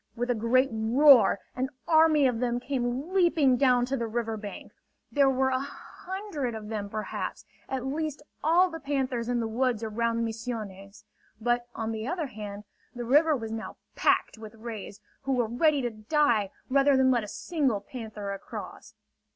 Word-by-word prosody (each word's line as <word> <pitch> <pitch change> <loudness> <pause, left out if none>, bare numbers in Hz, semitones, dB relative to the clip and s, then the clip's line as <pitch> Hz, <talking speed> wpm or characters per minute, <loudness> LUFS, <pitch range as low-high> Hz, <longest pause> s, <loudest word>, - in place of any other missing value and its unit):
With 245 +1 -1
a - - +3
great 245 +4 +2
roar 230 -1 +6 0.2
an 260 +1 -1 0.2
army 315 -3 +5
of 245 -3 +1
them 240 -1 0
came 255 +5 -3
leaping 335 -8 +4
down 250 -1 +3
to 265 +2 -2
the 235 -3 -2
river 225 0 -2
bank. 210 -1 -8 0.4
There 280 -2 +4
were 265 0 +1
a 255 - +1
hundred 300 - -5
of 215 -1 -7
them, 210 -2 -4
perhaps; 215 +1 -4 0.2
at 265 -1 -3
least 295 +1 -3 0.2
all 350 +4 +4
the 325 - -6
panthers 265 -5 -2
in 245 -1 +1
the 230 - -1
woods 235 0 0
around 230 +1 0
Misiones. 220 -3 -6 0.4
But, 240 +1 0
on 225 0 -3
the 220 +1 -4
other 340 0 -2
hand, 210 -4 -7 0.3
the 240 -1 -4
river 300 +5 +4
was 225 -2 -6
now 225 0 -6 0.2
packed - - +1
with 220 0 -10
rays, 220 -3 -8 0.2
who 270 0 -1
were 245 -2 +2
ready 275 +5 +2
to 240 - -1
die, 220 -2 +1 0.2
rather 275 +1 +4
than 260 0 +4
let 240 -3 +2
a - - -6
single 270 - -1
panther 210 -2 -7
across. 195 - -9
245 Hz, 175 wpm, -28 LUFS, 220-275 Hz, 0.4 s, roar